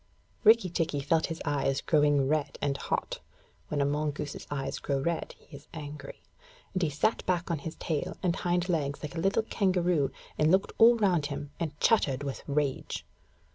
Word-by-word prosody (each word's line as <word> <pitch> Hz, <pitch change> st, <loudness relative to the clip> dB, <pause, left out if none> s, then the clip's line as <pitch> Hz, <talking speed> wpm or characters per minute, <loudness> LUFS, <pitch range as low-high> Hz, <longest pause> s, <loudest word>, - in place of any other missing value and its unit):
Rikki 220 Hz, -4 st, +6 dB
tikki 160 Hz, -4 st, 0 dB
felt 160 Hz, +3 st, +1 dB
his 165 Hz, 0 st, -5 dB
eyes 140 Hz, -1 st, +1 dB
growing 145 Hz, -3 st, +3 dB
red 150 Hz, 0 st, 0 dB
and 140 Hz, -1 st, 0 dB
hot -, -, -2 dB, 0.5 s
(when 145 Hz, -1 st, -1 dB
a -, -, +3 dB
mongoose's 150 Hz, 0 st, -2 dB
eyes 135 Hz, -1 st, -3 dB
grow 140 Hz, -, -1 dB
red, 170 Hz, +4 st, -2 dB
he 150 Hz, -, -15 dB
is 145 Hz, +2 st, -13 dB
angry), 145 Hz, -2 st, -8 dB, 0.5 s
and 185 Hz, -, -1 dB
he 165 Hz, -, +2 dB
sat 150 Hz, +10 st, 0 dB
back 175 Hz, -1 st, 0 dB
on 165 Hz, -, -1 dB
his 160 Hz, +3 st, -6 dB
tail 155 Hz, -3 st, -3 dB
and 175 Hz, -2 st, +2 dB
hind 175 Hz, 0 st, 0 dB
legs 145 Hz, -5 st, -1 dB
like 150 Hz, -, -5 dB
a 165 Hz, -, -4 dB
little 195 Hz, +5 st, +2 dB
kangaroo, 180 Hz, -9 st, +1 dB, 0.3 s
and 155 Hz, -, +4 dB
looked 190 Hz, +3 st, +3 dB
all 235 Hz, +1 st, +8 dB
round 180 Hz, -9 st, +2 dB
him, 145 Hz, 0 st, -6 dB
and 155 Hz, -4 st, -4 dB
chattered 145 Hz, -, +3 dB
with 140 Hz, -1 st, -4 dB
rage. 145 Hz, -2 st, -1 dB
150 Hz, 180 wpm, -29 LUFS, 145-175 Hz, 0.5 s, all